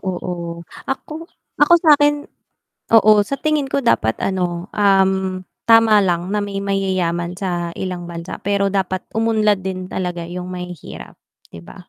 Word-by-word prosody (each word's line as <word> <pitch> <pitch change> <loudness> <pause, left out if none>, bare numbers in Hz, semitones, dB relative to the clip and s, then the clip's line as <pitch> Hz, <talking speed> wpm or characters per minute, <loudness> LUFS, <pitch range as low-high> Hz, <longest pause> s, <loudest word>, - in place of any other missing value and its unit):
oo, 175 -2 -4 0.4
ako 310 +4 -5 0.3
ako 295 +4 +6
sa'kin, 295 -1 +4 0.7
oo, 215 -1 +7
sa 275 - -2
tingin 305 -3 +1
ko 275 +1 -1
dapat 110 - +2
ano, 180 -1 -2
um, 190 -2 +2 0.2
tama 225 -2 +6
lang 180 -1 0
na 210 - 0
may 200 -1 -4
mayayaman 185 -3 -1
sa 175 -3 -3
ilang 180 -2 -5
bansa, 170 +1 -7
pero 200 0 0
dapat 185 -1 -1
umunlad 215 -2 +2
din 185 -1 -5
talaga 175 -2 -3
'yung 180 +1 -6
mahihirap, 180 -3 -8 0.3
'di 85 - -10
ba? 180 - -14
190 Hz, 140 wpm, -19 LUFS, 180-215 Hz, 0.7 s, oo